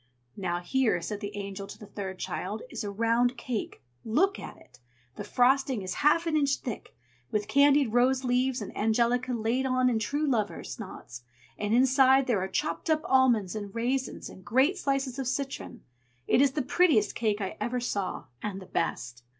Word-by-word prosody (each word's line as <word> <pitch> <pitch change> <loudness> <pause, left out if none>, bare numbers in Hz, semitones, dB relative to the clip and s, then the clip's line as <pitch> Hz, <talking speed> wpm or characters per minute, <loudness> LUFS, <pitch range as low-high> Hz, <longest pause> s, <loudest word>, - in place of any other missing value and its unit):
"Now 175 -2 -2
here," 225 0 +1
said 205 +4 -5
the 205 -1 -6
Angel 200 0 -6
to - - -10
the 210 - -11
third 190 -2 -6
child, 205 +4 -4
"is - - -4
a 205 - -3
round 230 +4 +1
cake. 235 - -5 0.2
Look 380 - +1
at - - -9
it! 125 -1 -20 0.4
the - - -6
frosting 255 -3 +2
is 185 0 -3
half 300 +3 +4
an 325 -2 0
inch 280 -2 +3
thick, 240 -5 -7 0.3
with 210 -1 -1
candied 280 -4 +4
rose 255 +2 +3
leaves 250 -1 +1
and - - -9
angelica 235 +4 +1
laid 235 +3 0
on 255 -1 +2
in 225 - +1
true 290 +8 -1
lovers' 225 -7 -2
knots; 125 - -9 0.3
and 210 0 -3
inside 265 +1 +5
there 230 -7 +1
are 190 - -2
chopped 185 - -2
up 310 -1 +3
almonds, 240 -8 +3
and 205 -1 -6
raisins, 255 +3 -2
and 185 - -12
great 265 - +3
slices 275 -6 -1
of 265 - -2
citron. 270 +1 -4 0.4
It 255 - +3
is 275 -1 +3
the 295 - -1
prettiest 295 - +3
cake 215 -3 0
I 195 -2 -4
ever 240 +3 -1
saw, 205 -5 -3 0.2
and 200 -2 -4
the 190 - -11
best." 125 -8 -3
240 Hz, 185 wpm, -28 LUFS, 205-265 Hz, 0.4 s, inside